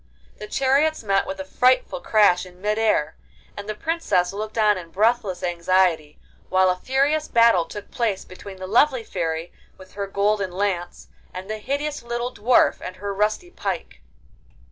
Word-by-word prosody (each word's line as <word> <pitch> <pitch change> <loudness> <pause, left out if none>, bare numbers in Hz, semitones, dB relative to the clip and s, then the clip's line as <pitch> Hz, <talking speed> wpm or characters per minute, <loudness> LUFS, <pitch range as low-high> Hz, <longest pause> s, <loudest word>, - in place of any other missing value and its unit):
The 210 - -7
chariots 275 +5 +1
met 195 -2 +1
with 190 - -5
a 190 - -5
frightful 250 -3 +2
crash 205 -4 +4
in 180 -1 -13
mid 210 +2 -1
air, 185 -9 +1 0.4
and 205 0 -8
the 215 - -3
Princess 265 - 0
looked 215 +2 -5
on 210 -1 +4
in 175 -3 -8
breathless 205 -1 0
anxiety 175 -3 +1 0.3
while 185 0 +4
a - - -1
furious 275 +9 0
battle 230 -7 +4
took 205 +3 -9
place 220 -6 -1
between 190 +1 -11
the 185 - -7
lovely 245 +5 +3
Fairy 165 -3 -3 0.3
with 185 0 -15
her 200 -1 -4
golden 200 -1 0
lance, 180 -2 -3 0.3
and 185 +1 -6
the 215 - -4
hideous 290 +5 -3
little 240 +1 -4
Dwarf 240 +4 +3
and 185 - -7
her 200 +1 -5
rusty 215 - -1
pike. - - -5
205 Hz, 165 wpm, -23 LUFS, 185-235 Hz, 0.4 s, crash